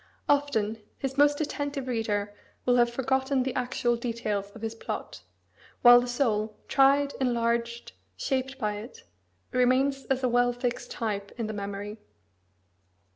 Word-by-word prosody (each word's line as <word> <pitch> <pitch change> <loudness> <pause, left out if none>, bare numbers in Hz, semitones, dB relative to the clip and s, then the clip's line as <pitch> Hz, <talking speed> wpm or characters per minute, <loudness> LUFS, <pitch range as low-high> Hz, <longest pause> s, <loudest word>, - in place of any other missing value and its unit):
Often, 225 -7 +1 0.2
his 270 -1 -3
most 290 +1 +4
attentive 285 -2 -3
reader 210 -4 -1 0.3
will 250 0 +4
have 240 0 +4
forgotten 265 +1 +1
the 260 -1 -2
actual 245 -1 0
details 225 -4 -3
of 225 - -11
his 225 0 -2
plot; 225 - -6 0.6
while 245 0 +9
the 245 - -4
soul, 220 -4 0
tried, 280 +1 +4
enlarged, 235 -1 0 0.3
shaped 265 - -2
by 210 -5 -2
it, 220 +4 -10 0.5
remains 265 +2 +2
as 265 -1 -1
a - - +4
well 245 0 +3
fixed 245 0 -3
type 205 -3 -3
in 230 - -2
the 215 - -4
memory. 205 +1 -5
245 Hz, 140 wpm, -28 LUFS, 220-265 Hz, 0.6 s, while